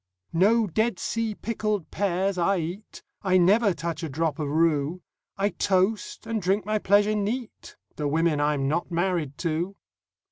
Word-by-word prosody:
No 215 +7 +4
Dead 220 +3 0
Sea 225 +1 -2
pickled 215 -5 -2
pears 195 0 0
I 185 +2 +2
eat; 175 +5 -6 0.2
I 185 -2 +3
never 200 +4 +4
touch 165 -2 -4
a 160 - -4
drop 155 +1 -1
of 150 -2 -2
rue; 160 +2 +1 0.3
I 200 +1 +2
toast, 200 +3 0
and 225 -1 -2
drink 195 +3 +1
my 215 0 0
pleasure 205 +2 +3
neat, 215 +4 -4 0.2
The 150 - -1
women 155 0 +1
I'm 145 -2 +1
not 170 +5 -1
married 170 -5 -1
to! 170 +4 -1
185 Hz, 155 wpm, -26 LUFS, 165-210 Hz, 0.3 s, No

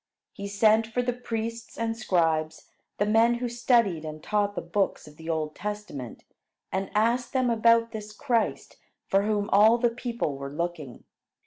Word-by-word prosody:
He 200 - -6
sent 215 +2 +3
for 245 +2 -1
the 245 0 0
priests 230 -1 -5
and 230 0 -1
scribes, 165 -7 0 0.3
the 205 - +1
men 225 +3 +4
who 245 +1 -2
studied 235 -8 +2
and 155 0 -7
taught 205 -1 0
the - - -2
books 185 0 -1
of 150 - -14
the 160 +2 -9
Old 155 -2 -1
Testament, 205 - -6 0.5
and 190 0 -2
asked 235 +3 +1
them 255 -2 +2
about 230 0 +4
this 215 -1 -7
Christ 230 +1 -1 0.3
for 195 - +2
whom 205 -1 0
all 215 +4 +6
the 240 -1 +2
people 235 - -3
were 140 0 -5
looking. 155 -4 -5
210 Hz, 165 wpm, -27 LUFS, 170-230 Hz, 0.5 s, all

